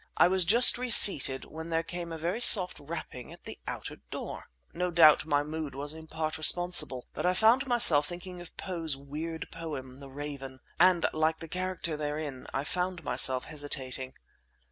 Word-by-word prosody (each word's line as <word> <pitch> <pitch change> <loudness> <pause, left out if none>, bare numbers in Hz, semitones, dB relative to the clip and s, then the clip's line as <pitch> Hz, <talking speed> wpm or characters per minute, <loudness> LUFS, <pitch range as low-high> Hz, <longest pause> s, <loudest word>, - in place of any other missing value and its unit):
I - - +5
was 185 -1 0
just 235 +6 +4
reseated 195 - +6
when 160 +1 -10
there 165 0 -1
came 175 0 -7
a 165 - -6
very 175 +8 -4
soft 185 -6 +5
rapping 140 -5 -9
at - - -15
the - - -10
outer - - -7
door! - - -8 0.3
No 180 +1 -3
doubt 165 -3 +4
my 145 -1 0
mood 155 -2 -7
was 145 +2 -7
in 160 0 -13
part 160 0 -5
responsible, 175 -6 +4
but - - -6
I 180 +1 +1
found 235 +7 +3
myself 170 - +5
thinking 180 +1 -9
of 175 - -13
Poe's 165 -6 -5
weird 155 +4 -7
poem, 140 -6 -8
"The 140 -1 -12
Raven"; 135 -1 -9 0.2
and 180 -1 +3
like 155 +1 0
the 165 - -9
character 180 -2 -5
therein 150 -3 -6
I 135 - -3
found 180 +2 -4
myself 130 -1 +1
hesitating. 130 -3 -4
160 Hz, 175 wpm, -28 LUFS, 145-180 Hz, 0.3 s, reseated